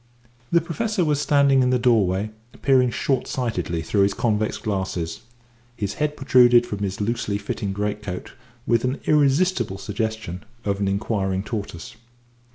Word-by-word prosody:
The 170 Hz, -, +4 dB
Professor 215 Hz, 0 st, -1 dB
was 150 Hz, -2 st, +1 dB
standing 140 Hz, -2 st, +4 dB
in 125 Hz, -, +3 dB
the 125 Hz, -, +3 dB
doorway 110 Hz, -5 st, +2 dB, 0.3 s
peering 130 Hz, -2 st, +4 dB
short 135 Hz, +2 st, -1 dB
sightedly 90 Hz, -, -2 dB
through 100 Hz, -, +1 dB
his 100 Hz, 0 st, +2 dB
convex 110 Hz, -4 st, 0 dB
glasses, 95 Hz, -6 st, -3 dB, 0.6 s
his 100 Hz, -3 st, -3 dB
head 150 Hz, 0 st, 0 dB
protruded 125 Hz, -3 st, +5 dB
from 105 Hz, -4 st, -5 dB
his 100 Hz, -1 st, -3 dB
loosely 105 Hz, -1 st, -1 dB
fitting 100 Hz, 0 st, -4 dB
great 105 Hz, +1 st, -2 dB
coat 90 Hz, -3 st, -6 dB, 0.3 s
with 115 Hz, -1 st, +2 dB
an 130 Hz, +2 st, -1 dB
irresistible 145 Hz, -, +2 dB
suggestion 110 Hz, -3 st, -4 dB, 0.2 s
of 100 Hz, -1 st, 0 dB
an 100 Hz, -, 0 dB
inquiring 95 Hz, -1 st, -1 dB
tortoise. 105 Hz, -4 st, -6 dB
110 Hz, 150 wpm, -23 LUFS, 100-130 Hz, 0.6 s, protruded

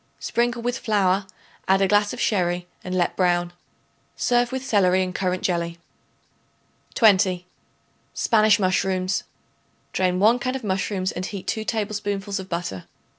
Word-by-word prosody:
Sprinkle 240 Hz, 0 st, -1 dB
with 245 Hz, +1 st, -1 dB
flour; 200 Hz, -4 st, +1 dB, 0.4 s
add 190 Hz, 0 st, +4 dB
a 195 Hz, -, +3 dB
glass 205 Hz, +1 st, +3 dB
of 250 Hz, -, -7 dB
sherry 180 Hz, -3 st, 0 dB, 0.2 s
and 185 Hz, 0 st, -4 dB
let 175 Hz, -1 st, +1 dB
brown. 175 Hz, -1 st, +1 dB, 0.6 s
Serve 245 Hz, 0 st, +1 dB
with 260 Hz, 0 st, -4 dB
celery 190 Hz, -5 st, +3 dB
and 185 Hz, 0 st, -4 dB
currant 185 Hz, 0 st, -1 dB
jelly. 170 Hz, -2 st, -1 dB, 1.2 s
20. 185 Hz, -5 st, +4 dB, 0.7 s
Spanish 215 Hz, -2 st, +4 dB
Mushrooms. 185 Hz, 0 st, 0 dB, 0.7 s
Drain 180 Hz, -1 st, +1 dB
1 225 Hz, +5 st, +4 dB
can 255 Hz, +1 st, -2 dB
of 265 Hz, -, -5 dB
mushrooms 190 Hz, -1 st, -1 dB
and 185 Hz, +1 st, -4 dB
heat 200 Hz, -3 st, -7 dB
2 220 Hz, -, -2 dB
tablespoonfuls 205 Hz, -2 st, -2 dB
of 190 Hz, 0 st, -8 dB
butter. 170 Hz, -, -4 dB
195 Hz, 140 wpm, -23 LUFS, 185-215 Hz, 1.2 s, add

